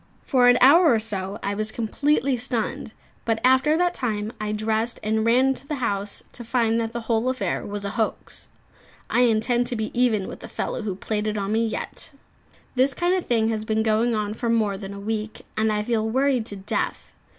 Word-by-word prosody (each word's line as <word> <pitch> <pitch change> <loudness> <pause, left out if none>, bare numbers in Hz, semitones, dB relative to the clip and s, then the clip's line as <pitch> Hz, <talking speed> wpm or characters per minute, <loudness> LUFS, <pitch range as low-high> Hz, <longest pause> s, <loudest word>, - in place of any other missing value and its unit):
For 255 -4 +4
an 245 0 +6
hour 315 +5 +7
or 225 - +3
so 200 -2 -4
I 200 - -1
was 215 +1 -1
completely 270 +4 +1
stunned; 235 -3 -3 0.3
but 225 -1 0
after 260 +5 +4
that 355 0 +2
time 220 -5 -2
I 210 0 -2
dressed 220 +2 -1
and 220 +1 +1
ran 255 +4 +4
to 275 - -12
the 300 - -2
house, 205 -6 -1
to 240 - -6
find 230 -1 +1
that 225 0 -3
the 235 0 -4
whole 230 +2 0
affair 255 -1 -2
was 205 0 -4
a 200 - -2
hoax. 220 0 -3 0.6
I - - +3
intend 240 +1 +2
to 245 - -2
be 220 -1 -3
even 235 -6 +2
with - - -8
the - - -9
fellow - - -3
who 205 -4 -3
played 210 +2 -2
it 215 0 -1
on 200 0 -2
me, 225 +1 +2
yet. 285 +7 -6 0.6
This 265 +2 +2
kind 350 +1 +1
of 370 -2 -1
thing 225 -2 +2
has 220 -1 -1
been 220 0 0
going 225 +2 +2
on 210 -1 -2
for 235 +2 -3
more 220 -3 +2
than 195 0 -7
a - - -7
week, 215 +1 -4
and 220 0 +1
I 210 0 0
feel 220 -1 0
worried 260 -1 +1
to 205 - -3
death. 195 +1 -3
225 Hz, 215 wpm, -24 LUFS, 215-250 Hz, 0.6 s, hour